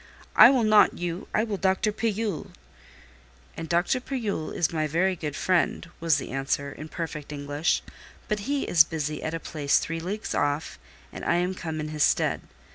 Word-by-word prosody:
"I - - +10
will 260 -3 +3
not 215 -1 +5
you: 175 +1 -4
I 215 - +2
will 215 -3 -3
Dr. 190 +3 +1
Pillule!" 215 -4 -2 1.1
"And 165 -1 -6
Dr. 175 +9 +2
Pillule 225 - -3
is 170 - -1
my 155 -1 0
very 180 +5 +1
good 150 -4 -5
friend," 180 -2 +1
was 165 -3 +3
the - - -5
answer, 140 +1 -2
in 155 - -8
perfect 155 -3 -5
English; 145 +2 -1 0.4
"but 210 +3 -3
he 285 -1 0
is 165 -3 +6
busy 155 -2 -4
at 160 +1 -3
a - - -3
place 150 -3 +1
three 165 0 -2
leagues 195 +6 -4
off, 145 +2 -1 0.3
and - - -8
I - - +2
am 180 +2 0
come 160 -4 -5
in 155 0 -4
his 155 -1 -4
stead. - - +2
165 Hz, 185 wpm, -26 LUFS, 155-200 Hz, 1.1 s, I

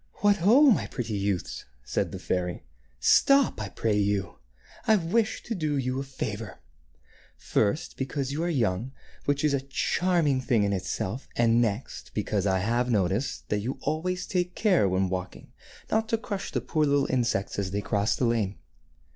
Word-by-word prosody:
"What, 205 0 +4
ho! 220 - +5
my - - +1
pretty 115 -4 -4
youths," 100 -2 -2 0.2
said 65 - -1
the - - -5
fairy: 90 -5 -2 0.3
"stop, 275 - +4
I 105 - -4
pray 110 +1 -1
you. 100 -1 0 0.5
I 220 - +6
wish 210 +5 0
to 235 - -4
do 155 -7 -1
you 130 0 -1
a - - -2
favor. 110 -7 -5 0.8
First, 110 +8 -1
because 135 0 -2
you 150 +3 -2
are 175 - 0
young, 120 - 0 0.3
which 145 0 +1
is 150 -2 +3
a 140 - +1
charming 145 +1 +1
thing 120 -4 +2
in 100 0 +1
itself, 95 +5 -3
and 115 0 +4
next 110 +1 -3
because 105 -1 0
I 95 -1 +2
have 120 +4 0
noticed 105 +3 0
that 105 - +1
you 120 +6 -3
always 180 +3 -2
take 180 -2 -1
care 185 - +3
when 95 +1 +1
walking 90 0 -5 0.4
not 220 0 +1
to 225 - +2
crush 205 -3 -5
the - - -1
poor 155 -2 0
little 140 -1 +3
insects 120 -7 0
as 95 -2 -1
they 100 +2 -2
cross 100 +1 0
the 125 - 0
lane. 110 -4 0
125 Hz, 175 wpm, -27 LUFS, 100-160 Hz, 0.8 s, I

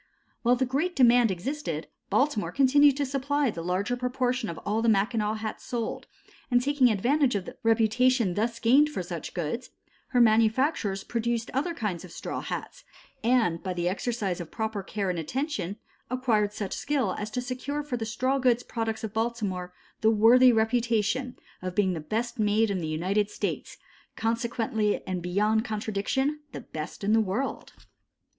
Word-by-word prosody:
While 245 +1 +4
the 260 +1 +1
great 290 +8 -1
demand 245 -2 +5
existed, 190 - -3 0.2
Baltimore 265 -6 +1
continued 280 +1 +5
to 285 - 0
supply 275 0 0
the 170 - -6
larger 185 +7 -1
proportion 250 -1 -1
of 165 - -6
all 215 +2 0
the 230 - +3
Mackinaw 215 +1 +1
hats 215 0 -5
sold, 235 -2 -4 0.4
and 245 -2 +4
taking 270 -1 +3
advantage 250 +5 +2
of 195 -3 -2
the - - -9
reputation 225 -1 +3
thus 230 +4 -1
gained 265 +6 +4
for 245 -11 -4
such 170 -2 -6
goods, 175 +8 -3 0.4
her 250 - +1
manufacturers 220 -2 +3
produced 235 0 -2
other 305 +6 -1
kinds 195 - -3
of 180 - -11
straw - - -5
hats, - - -6 0.4
and 230 -9 +2
by 185 -1 -3
the 175 0 -1
exercise 200 -2 -2
of 165 - -8
proper 220 -2 -3
care 195 0 -2
and 175 - -3
attention 205 - -3 0.3
acquired 230 -5 +1
such 205 -2 -4
skill 245 -4 0
as 210 0 -4
to 215 - -3
secure 260 +4 -3
for 285 -4 -3
the 230 - -3
straw 255 +5 0
goods 245 -2 +2
products 225 -1 -3
of 215 -2 -4
Baltimore 215 -6 -2 0.3
the 220 - +4
worthy 235 +4 +6
reputation 230 +2 +1 0.2
of 185 0 -4
being 190 -2 +2
the 165 - -3
best 230 +9 -3
made 215 +1 +2
in 190 - -1
the 160 - -3
United 190 +7 0
States, - - -4 0.4
consequently 225 -1 -1
and 185 -1 -3
beyond 210 +5 +1
contradiction 220 +7 -1
the - - -6
best 155 +5 -7
in 205 +2 +2
the 225 - +5
world. 215 +7 -3
225 Hz, 170 wpm, -27 LUFS, 200-255 Hz, 0.4 s, worthy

